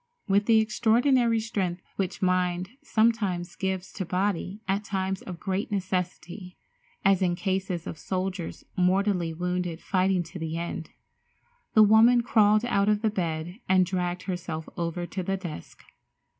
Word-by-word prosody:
With 200 +1 +2
the 225 -1 +6
extraordinary 230 +2 +3
strength 190 -6 -2
which 190 -1 -3
mind 180 0 +1
sometimes 215 -6 +1
gives 190 -1 -3
to 195 - -3
body 185 +2 -1
at 200 +2 0
times 190 -1 -2
of 180 -3 -8
great 195 +2 -2
necessity, 185 -1 -3 0.5
as 195 -1 +4
in 175 -2 +2
cases 190 -2 -2
of 155 - -6
soldiers 185 -2 -3
mortally 185 -1 +2
wounded 180 0 -2
fighting 185 -1 +1
to 180 +2 -9
the 160 0 -3
end, 170 -2 -4 0.9
the 215 - +8
woman 225 +3 +6
crawled 215 -2 +4
out 200 -3 +2
of 210 +1 +1
the 220 - +2
bed 170 0 -3
and 185 -1 +5
dragged 180 0 -2
herself 170 -4 -4
over 170 0 -2
to 185 +2 -4
the 195 +2 -1
desk. 170 - -8
190 Hz, 145 wpm, -27 LUFS, 180-205 Hz, 0.9 s, the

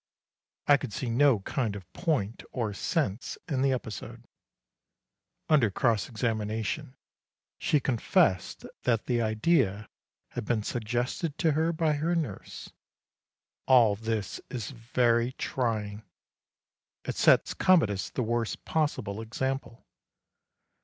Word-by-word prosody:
I 145 - +6
could 130 -7 -6
see 125 -3 -2
no 130 -3 +4
kind 110 0 -2
of 95 -2 -10
point 130 - -1
or 115 -5 -2
sense 110 - -2
in 140 -6 0
the 135 0 +3
episode. 120 -4 -5 1.2
Under 140 -8 +4
cross 110 +3 +1
examination, 115 +4 -2 0.6
she 150 - +2
confessed 130 - +1 0.2
that 115 -3 +1
the 120 -2 +1
idea 110 - +1 0.4
had 120 - -5
been 110 -1 0
suggested 120 +8 -2
to 165 -3 +2
her 160 +3 +1
by 160 -2 +1
her 160 +4 0
nurse. 145 - -5 0.9
All 120 -6 +6
this 110 -2 -3
is 120 -2 -4
very 120 0 +1
trying. 110 -6 -2 1.0
It - - -3
sets - - +4
Commodus 105 - +3
the 125 - -2
worst 115 0 -2
possible 130 -10 -1
example. 130 +1 -4
120 Hz, 115 wpm, -28 LUFS, 110-140 Hz, 1.2 s, I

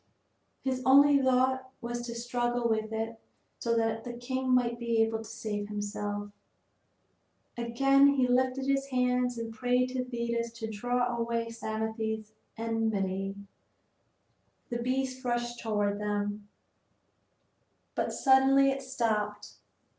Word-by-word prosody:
His 260 -1 -1
only 280 +2 +6
thought 260 0 +2
was 240 0 -4
to 235 - -5
struggle 240 0 -1
with 220 -1 0
it 225 +1 -3 0.4
so 230 -1 +1
that 225 0 0
the 245 - -6
king 260 +2 -3
might 240 -2 +2
be 235 -1 0
able 225 0 -1
to - - -7
save 210 -2 -4
himself. 205 0 -4 1.2
Again 275 +4 +4
he 275 -3 +3
lifted 255 +1 +2
up 270 - -2
his 275 0 0
hands 250 -1 +1
and 230 -1 -5
prayed 250 +2 +1
to 255 0 -2
Thetis 235 -1 -2
to 225 -1 -5
draw 245 +3 0
away 230 0 -1
Psamathe's 220 -1 -3 0.2
enmity. 200 -4 -1 1.4
The 240 0 -2
beast 260 +1 -1
rushed 240 -1 -1
toward 205 -2 0
them; 205 0 -2 1.5
but - - -1
suddenly 270 +1 +5
it 270 0 -3
stopped. 220 -6 -2
235 Hz, 125 wpm, -30 LUFS, 220-255 Hz, 1.5 s, only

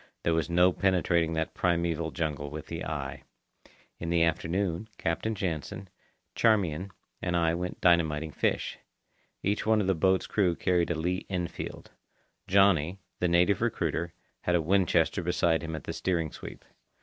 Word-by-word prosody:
There 85 - +2
was 80 +1 0
no 90 +1 +4
penetrating 85 -4 +2
that 80 0 -2
primeval 85 -2 0
jungle 75 -3 -3
with 75 +1 -7
the - - -5
eye. - - -4 0.8
In 85 - -4
the 85 -1 +3
afternoon, 85 +4 -1
Captain 110 +7 -1
Jansen, 95 +2 -4 0.4
Charmian, 95 -6 +2 0.3
and 90 -1 0
I 85 -1 +2
went 90 +1 -4
dynamiting 80 -3 +3
fish. - - -1 0.6
Each 100 +2 0
one 110 0 +3
of 105 - +1
the 95 - +3
boat's 95 +2 +2
crew 90 -5 +1
carried 90 -1 +1
a 85 - 0
Lee 90 +4 -2
Enfield. 90 -3 -5 0.6
"Johnny," 95 -3 +4 0.2
the 90 - +2
native 90 +4 +3
recruiter, 85 -7 -1 0.3
had 90 - +1
a 85 - +3
Winchester 90 0 +2
beside 85 -1 +1
him 80 -1 -4
at 75 - -7
the - - -5
steering 85 -4 -1
sweep. - - -10
85 Hz, 155 wpm, -29 LUFS, 80-95 Hz, 0.8 s, no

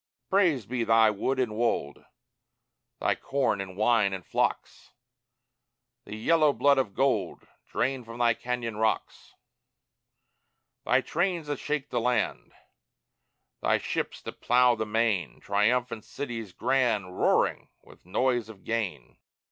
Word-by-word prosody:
Praised 170 - +2
be 125 -1 -1
thy 115 -1 +5
wood 130 +6 -1
and 120 -5 -1
wold, 110 -11 -1 1.0
Thy - - +2
corn 135 -7 -1
and 95 -1 -8
wine 105 -2 +3
and 95 -2 -6
flocks, - - -2 1.1
The 105 - -7
yellow 155 +6 +3
blood 140 -1 +3
of 110 -7 -2
gold 135 0 0 0.2
Drained 130 -1 -1
from 115 0 -8
thy 120 -1 +3
cañon 115 -2 -4
rocks; 110 0 -2 1.5
Thy - - +3
trains 175 -1 -1
that 145 -1 -3
shake 145 -2 -3
the 120 - 0
land, 125 +1 -1 1.1
Thy - - +3
ships - - -4
that - - -9
plough 125 0 +4
the 110 -1 -3
main, 110 -3 0
Triumphant 115 +2 0
cities 115 -7 -6
grand 110 -4 0
Roaring - - +2
with - - -18
noise 120 +4 0
of 100 -4 -13
gain. 115 -4 -4
120 Hz, 130 wpm, -27 LUFS, 110-130 Hz, 1.5 s, thy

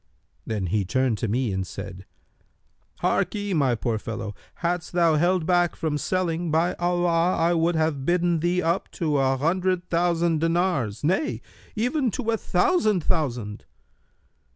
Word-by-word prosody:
Then 105 -4 -2
he 100 +3 0
turned 125 +3 0
to 115 - -1
me 115 0 0
and 95 - -1
said, 95 -1 -8 1.0
'Harkye, 205 -2 0
my 135 -7 +2
poor 115 -1 -2
fellow, 110 -1 -5 0.2
hadst 175 0 -2
thou 170 -2 +4
held 175 +2 +2
back 175 -1 +2
from 150 -2 -2
selling, 170 +2 -1
by 165 +3 +2
Allah 175 0 +2
I 170 +1 +2
would 170 +1 +1
have 155 -4 0
bidden 175 +1 +2
thee 175 +2 +1
up 170 +3 0
to 155 -5 0
an 135 0 +2
hundred 180 +4 0
thousand 170 -2 +1
dinars, 165 - 0
nay, 190 - 0 0.4
even 250 +4 +1
to 230 -3 -1
a 225 - +1
thousand 220 - +2
thousand!' 125 - -2
165 Hz, 150 wpm, -25 LUFS, 130-180 Hz, 1.0 s, thou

